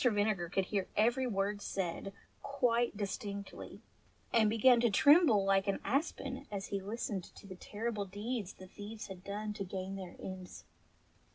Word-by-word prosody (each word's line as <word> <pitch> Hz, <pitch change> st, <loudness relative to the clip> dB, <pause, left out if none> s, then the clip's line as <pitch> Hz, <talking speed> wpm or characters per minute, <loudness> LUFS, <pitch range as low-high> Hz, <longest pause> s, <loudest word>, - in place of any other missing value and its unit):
Vinegar 205 Hz, -6 st, +2 dB
could 195 Hz, +1 st, +1 dB
hear 195 Hz, -2 st, -1 dB
every 240 Hz, +5 st, +3 dB
word 200 Hz, -1 st, -1 dB
said 190 Hz, 0 st, -3 dB, 0.3 s
quite 240 Hz, -5 st, +1 dB
dis 200 Hz, -2 st, -2 dB
tinctly, 200 Hz, -1 st, -7 dB, 0.5 s
and 220 Hz, -2 st, +5 dB
began 235 Hz, +3 st, +6 dB
to 240 Hz, -, +4 dB
tremble 265 Hz, -, +6 dB
like 195 Hz, 0 st, +3 dB
an 200 Hz, -, +1 dB
aspen 270 Hz, -, -1 dB
as 200 Hz, -1 st, -4 dB
he 200 Hz, -1 st, -2 dB
listened 205 Hz, -2 st, -3 dB
to -, -, -13 dB
the 195 Hz, -, -8 dB
terrible 210 Hz, +2 st, -3 dB
deeds 205 Hz, +1 st, -4 dB
the 185 Hz, -, -12 dB
thieves 210 Hz, +3 st, -8 dB
had 185 Hz, -1 st, -9 dB
done 210 Hz, +2 st, -3 dB
to 200 Hz, -, -4 dB
gain 190 Hz, +1 st, -4 dB
their 185 Hz, -2 st, -7 dB
ends. 185 Hz, -1 st, -8 dB
205 Hz, 165 wpm, -34 LUFS, 195-230 Hz, 0.5 s, began